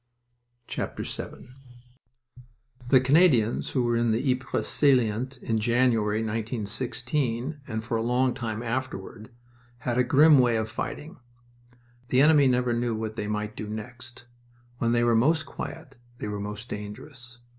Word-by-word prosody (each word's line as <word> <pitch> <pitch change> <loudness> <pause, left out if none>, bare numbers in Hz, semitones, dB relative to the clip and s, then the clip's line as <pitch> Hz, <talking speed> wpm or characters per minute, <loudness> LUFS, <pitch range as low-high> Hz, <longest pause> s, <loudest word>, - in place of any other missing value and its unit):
VII - - -4 1.8
The 130 +1 +6
Canadians 130 -4 +3
who 130 - 0
were 120 0 +1
in 120 0 +1
the 120 +5 +1
Ypres 130 0 -2
salient 130 -2 +2
in 110 -1 0
January, 115 -2 +2
1916, 120 +5 -2
and 110 0 -4
for 115 0 -2
a - - -1
long 125 +2 +1
time 115 -1 -4
afterward, 115 -3 -4 0.6
had 120 0 0
a - - +5
grim 145 +3 +6
way 120 -2 +3
of 110 0 -3
fighting. 160 +5 -5 0.9
The 130 +2 +3
enemy 150 -2 +6
never 125 -1 +2
knew 120 -1 -1
what 110 0 -4
they 105 -2 -3
might 105 0 -3
do 105 - -6
next. 120 +3 -8 0.5
When 115 - +1
they 120 0 +2
were 120 0 +3
most 155 +7 +3
quiet 140 -1 -8 0.2
they 105 - -5
were 105 0 -4
most 105 +3 -6
dangerous. 120 +4 -8
120 Hz, 145 wpm, -26 LUFS, 110-130 Hz, 1.8 s, The